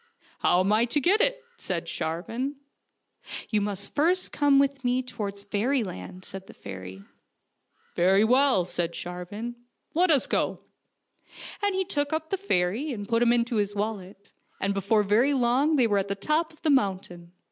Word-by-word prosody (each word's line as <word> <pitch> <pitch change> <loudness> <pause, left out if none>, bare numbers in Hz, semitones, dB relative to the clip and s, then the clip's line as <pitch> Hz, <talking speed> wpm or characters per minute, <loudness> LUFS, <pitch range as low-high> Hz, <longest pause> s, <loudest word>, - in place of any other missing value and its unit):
" - - -30
How 180 - +3
am 195 +3 +2
I 225 +2 +4
to 245 +5 +1
get 375 +10 +3
to - - +5
it? - - -6
" - - -35
said - - -3
Sharvan. 225 - -3 0.4
" - - -11
You 210 -2 +2
must 200 -1 -3
first 350 +5 +2
come 285 -2 +3
with 275 -1 +1
me 250 +1 +1
towards 200 -5 -5
fairy 225 +6 0
land," 180 - -8
said 190 0 -9
the - - -13
fairy. 95 +1 -9 0.5
" - - -41
Very 190 +4 +4
well," 250 -5 +4
said 170 -1 -2
Sharvan; 180 +7 -6 0.2
" - - -48
let 355 +3 +3
us 290 -5 +4
go." - - -1 1.0
And 405 -2 +1
he 380 0 0
took 290 -4 -1
up 315 0 -3
the 390 - +1
fairy 250 - 0
and 205 -5 -5
put 230 0 +1
him 240 -1 +4
into 235 -1 +1
his 205 0 0
wallet, 200 -2 -5 0.3
and 195 +1 0
before 200 +2 +2
very 235 +8 +3
long 260 +5 +2
they 255 -4 +4
were 205 -3 +2
on 195 - -2
the 200 - -2
top 310 +10 0
of 315 - -23
the 310 - +3
mountain. 185 -8 -1
225 Hz, 195 wpm, -26 LUFS, 195-280 Hz, 1.0 s, to